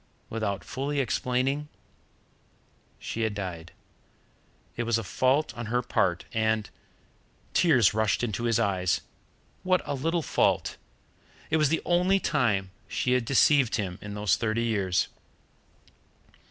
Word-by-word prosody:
Without 105 -3 -2
fully 140 +2 -3
explaining, 135 +3 0 1.3
she 115 - -5
had 110 -2 0
died. 90 -4 -6 1.0
It - - -2
was 115 -1 +1
a 115 - -3
fault 130 +9 +1
on 120 -1 -5
her 120 +2 0
part, 90 -6 0
and 110 -1 0 0.8
tears 125 - +4
rushed 110 +1 +1
into 115 0 -2
his 115 0 +2
eyes 95 -5 +1 0.6
what 185 -2 +2
a - - -2
little 165 +5 -1
fault! - - +1 0.7
It 160 - +4
was 150 -3 +3
the 165 - 0
only 180 +3 +3
time 110 - 0 0.2
she 125 - -1
had 125 -2 +2
deceived 140 0 +4
him 95 -5 -3
in 105 0 -7
those 105 -3 +2
thirty 115 +1 0
years. 100 -6 +1
115 Hz, 130 wpm, -27 LUFS, 105-140 Hz, 1.3 s, tears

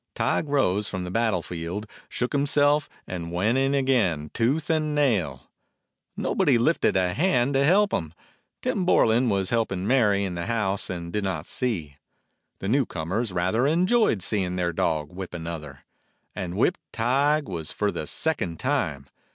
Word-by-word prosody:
Tige 155 - 0
rose 105 -8 +1
from 95 -2 -4
the 90 - -5
battle 110 -5 +1
field, 90 +5 -5 0.2
shook 125 +3 -2
him 140 0 +1
self, 145 0 +3 0.2
and 85 -2 -5
went 100 +7 +1
in 135 +1 +2
again, 110 - +1
tooth 140 +7 0
and 155 -2 0
nail. 120 - 0 0.7
Nobody 135 -4 +2
lifted 120 - +2
a 90 -1 +1
hand 140 - +2
to 135 +1 +3
help 200 +7 +4
him. 80 0 -2 0.5
Tim 190 - 0
Bor 180 - +4
lan 115 +2 +2
was 95 -2 0
helping 95 -5 0
Mary 105 -5 +3
in 95 -2 -3
the 85 -1 -4
house 105 -4 -1
and 85 -2 -5
did 105 - -1
not 90 -5 -2
see. 85 - -3 0.6
The 95 - -5
new 130 +4 +2
comers 95 +7 -2
rather 95 +9 +1
enjoyed 180 - +2
seeing 95 -3 -1
their 90 -1 -1
dog 75 -2 -1
whip 90 -1 -7
another. 80 -5 -7 0.5
And 90 0 -5
whipped 180 - +2
Tige 140 +6 +2
was 85 - -5
for 105 -1 0
the 75 - -5
second 90 - -1
time. 95 - -1
105 Hz, 165 wpm, -25 LUFS, 90-135 Hz, 0.7 s, help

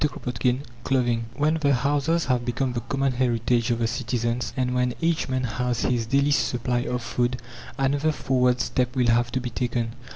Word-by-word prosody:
CHAPTER 140 -4 -2
VII 125 +2 0 0.2
CLOTHING 120 -3 +1
When 150 +2 +2
the 140 -2 +3
houses 145 +5 +1
have 125 -2 +1
become 125 +1 -1
the 120 - -1
common 135 +3 -1
heritage 120 -1 +1
of 120 - +1
the 115 - 0
citizens, 120 0 -1
and 125 -1 0
when 125 -1 +1
each 165 -3 0
man 130 0 0
has 125 +1 -1
his 120 -3 0
daily 140 +4 +2
supply 125 -3 +1
of 125 -1 -2
food, 125 +1 -1 0.4
another 140 +3 +1
forward 125 -4 +1
step 125 0 -1
will 125 -2 +2
have 120 +1 +2
to 130 - +1
be 125 -1 -5
taken. 120 -1 -2
125 Hz, 190 wpm, -25 LUFS, 120-135 Hz, 0.4 s, the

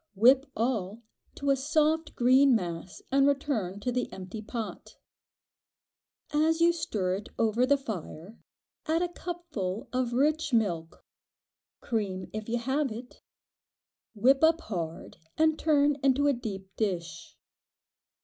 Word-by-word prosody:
Whip 260 +7 +5
all 225 -2 -2 0.3
to 280 0 0
a - - +4
soft 310 +3 +1
green 260 +2 +5
mass 175 -2 -4
and 275 +1 +4
return 265 -10 -1
to 250 - -1
the 250 0 -2
empty 190 +3 -7
pot. 220 0 -7 1.4
As 315 +2 +2
you 340 +1 +5
stir 190 - -1
it 205 - -10
over 230 +3 +2
the 285 +1 +4
fire 205 - -7 0.5
add 325 +2 +2
a 355 - -1
cupful 305 - -5
of 250 -1 0
rich 295 +2 +1
milk—cream, 190 +1 -4
if 215 +1 -5
you 240 - +1
have 265 +3 -1
it—whip 245 +2 -3
up 325 +1 +5
hard 170 -6 -5 0.2
and 315 0 +3
turn 295 -2 +3
into 275 +1 +3
a 285 - +4
deep 195 -6 -7
dish. 170 -5 -3
245 Hz, 125 wpm, -29 LUFS, 200-285 Hz, 1.4 s, Whip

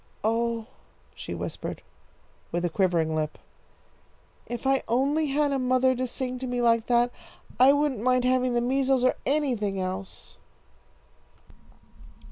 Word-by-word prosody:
"Oh," 230 +1 0 0.5
she - - -7
whispered, - - -6 0.7
with 175 +1 -1
a 175 - -1
quivering 170 -4 +1
lip, 155 -1 -2 1.1
"if 240 +1 -6
I 270 0 +3
only 280 +6 +1
had 290 +1 +1
a 275 - 0
mother 255 0 +2
to 255 +1 -2
sing 255 +1 -4
to 260 - -4
me 245 0 -2
like 230 -1 +2
that, 240 0 +3 0.5
I 260 +2 +8
wouldn't 285 -6 0
mind 255 +1 +2
having 255 -1 +2
the 240 - +2
measles 265 +1 +1
or 255 - +4
anything 245 -10 0
else!" 190 +1 -6
250 Hz, 135 wpm, -26 LUFS, 225-265 Hz, 1.1 s, I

